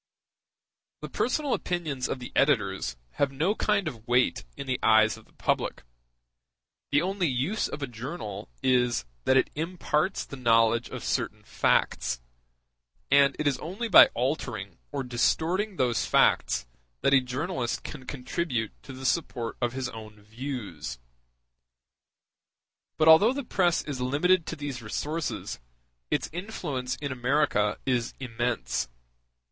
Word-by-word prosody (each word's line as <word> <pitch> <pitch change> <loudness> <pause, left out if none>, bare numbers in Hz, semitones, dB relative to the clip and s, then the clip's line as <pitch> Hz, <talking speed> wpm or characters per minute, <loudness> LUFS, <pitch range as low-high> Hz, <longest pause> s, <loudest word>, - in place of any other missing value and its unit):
] - - -63
The - - -5
personal 280 +2 0
opinions 155 -8 -2
of - - -1
the 125 -1 -8
editors 100 - +1 0.2
have 140 -1 +2
no 160 +9 +1
kind 210 -4 +1
of 115 -6 -7
weight 125 +1 +2
in 140 - -5
the 130 -1 -1
eyes 110 -1 +5
of 110 - -15
the - - -27
public: - - -1 1.1
the 145 +3 +3
only 190 -1 0
use 140 - 0
of 145 - -6
a - - -1
journal 120 - -6
is, 125 - +2 0.2
that 130 - +5
it - - +2
imparts 165 +2 -1
the 140 - -9
knowledge 115 -1 +3
of - - -6
certain - - -2
facts, - - +1 0.9
and 140 0 +5
it 155 - -2
is 145 -2 +1
only 195 +9 -4
by 200 - +10
altering 115 - -2
or 140 -2 -2
distorting 170 - +1
those 125 -6 +1
facts - - +3 0.4
that 135 - +3
a 130 - +7
journalist 130 +1 -3
can 130 -4 -8
contribute 125 -4 -2
to 135 - -10
the 130 +1 -8
support 120 -3 -1
of 120 0 0
his 130 -1 -2
own 110 -2 -11
views. 110 - -6 2.0
But 155 - +3
although 165 +10 +8
the 280 +1 -3
press 180 -7 +1
is 140 -4 -5
limited 160 +7 +2
to - - -3
these 140 -4 -5
resources, 150 +9 -3 0.5
its - - 0
influence 165 - -3
in 140 -2 -5
America 125 -4 +1
is 125 -3 0
immense. 120 - -2
130 Hz, 140 wpm, -28 LUFS, 120-160 Hz, 2.0 s, by